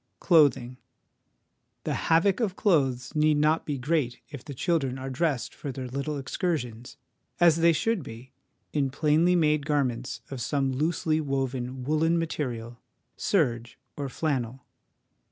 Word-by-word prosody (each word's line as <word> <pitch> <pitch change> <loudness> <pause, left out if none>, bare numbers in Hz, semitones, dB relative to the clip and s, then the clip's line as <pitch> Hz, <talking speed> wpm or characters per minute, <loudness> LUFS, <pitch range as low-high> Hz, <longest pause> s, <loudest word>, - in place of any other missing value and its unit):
Clothing. 135 -7 +3 1.1
The - - -1 0.2
havoc 175 +5 +4
of 210 -6 -1
clothes 135 - +1
need 150 0 +3
not 155 +2 +2
be 145 -2 -1
great 130 -2 -1
if 140 -5 -8
the 140 - -8
children 140 -3 0
are 135 0 -5
dressed 140 -2 -1
for 140 - -6
their 130 0 -6
little 140 +4 -3
excursions, 130 - -3 0.4
as 170 -2 +5
they 170 0 +5
should 220 +5 0
be, 120 0 -10 0.4
in 140 -3 +1
plainly 155 +5 +3
made 150 -3 +2
garments 130 -5 -1
of 135 -3 -5
some 135 +2 0
loosely 155 +3 0
woven 130 -2 -3
woollen 155 +4 +2
material, 125 -8 -3 0.4
serge 120 - 0 0.2
or 140 -2 -4
flannel. 130 -4 -2
145 Hz, 135 wpm, -27 LUFS, 130-160 Hz, 1.1 s, as